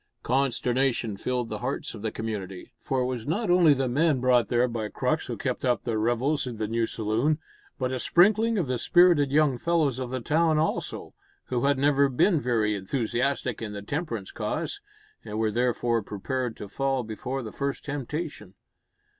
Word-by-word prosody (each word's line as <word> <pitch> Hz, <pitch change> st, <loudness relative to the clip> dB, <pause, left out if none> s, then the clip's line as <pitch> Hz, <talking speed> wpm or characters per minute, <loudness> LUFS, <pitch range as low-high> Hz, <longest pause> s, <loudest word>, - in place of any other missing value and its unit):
Consternation 125 Hz, -3 st, +1 dB
filled 125 Hz, +3 st, -2 dB
the 105 Hz, -, -4 dB
hearts 130 Hz, +5 st, -3 dB
of -, -, -9 dB
the 110 Hz, -, -1 dB
community, 100 Hz, -2 st, -5 dB
for 130 Hz, -1 st, -1 dB
it -, -, +1 dB
was 125 Hz, -2 st, -4 dB
not 175 Hz, +5 st, 0 dB
only 175 Hz, -3 st, +6 dB
the 135 Hz, -1 st, 0 dB
men 145 Hz, +2 st, +2 dB
brought 125 Hz, -1 st, +3 dB
there 120 Hz, +1 st, +2 dB
by 115 Hz, -3 st, -3 dB
Crux -, -, -1 dB
who -, -, -4 dB
kept -, -, -3 dB
up 125 Hz, -2 st, +1 dB
their 115 Hz, -2 st, -1 dB
revels 125 Hz, +6 st, +1 dB
in 120 Hz, -3 st, -5 dB
the 110 Hz, 0 st, -2 dB
new 115 Hz, +1 st, 0 dB
saloon, 115 Hz, +8 st, 0 dB, 0.4 s
but 130 Hz, -1 st, -1 dB
a 130 Hz, -, -2 dB
sprinkling 215 Hz, -, +4 dB
of 175 Hz, -7 st, 0 dB
the 125 Hz, -1 st, -1 dB
spirited 175 Hz, -2 st, +5 dB
young 145 Hz, -4 st, +3 dB
fellows 155 Hz, -6 st, +1 dB
of 130 Hz, -2 st, -4 dB
the 130 Hz, +1 st, -3 dB
town 155 Hz, +5 st, +2 dB
also, 155 Hz, +1 st, -2 dB, 0.4 s
who 125 Hz, 0 st, 0 dB
had 140 Hz, 0 st, +3 dB
never 140 Hz, 0 st, +3 dB
been 155 Hz, +5 st, +3 dB
very 115 Hz, -4 st, +1 dB
enthusiastic 120 Hz, +4 st, -1 dB
in 105 Hz, -2 st, -5 dB
the 100 Hz, 0 st, -6 dB
temperance 120 Hz, -, -4 dB
cause, -, -, -3 dB, 0.4 s
and 110 Hz, -1 st, -6 dB
were 110 Hz, -1 st, +1 dB
therefore 120 Hz, 0 st, +1 dB
prepared 120 Hz, +4 st, -3 dB
to 105 Hz, -, -7 dB
fall 135 Hz, +3 st, -1 dB
before 125 Hz, +4 st, -4 dB
the 110 Hz, -, -7 dB
first 140 Hz, -1 st, -3 dB
temptation. 145 Hz, +3 st, -5 dB
125 Hz, 185 wpm, -27 LUFS, 115-140 Hz, 0.4 s, only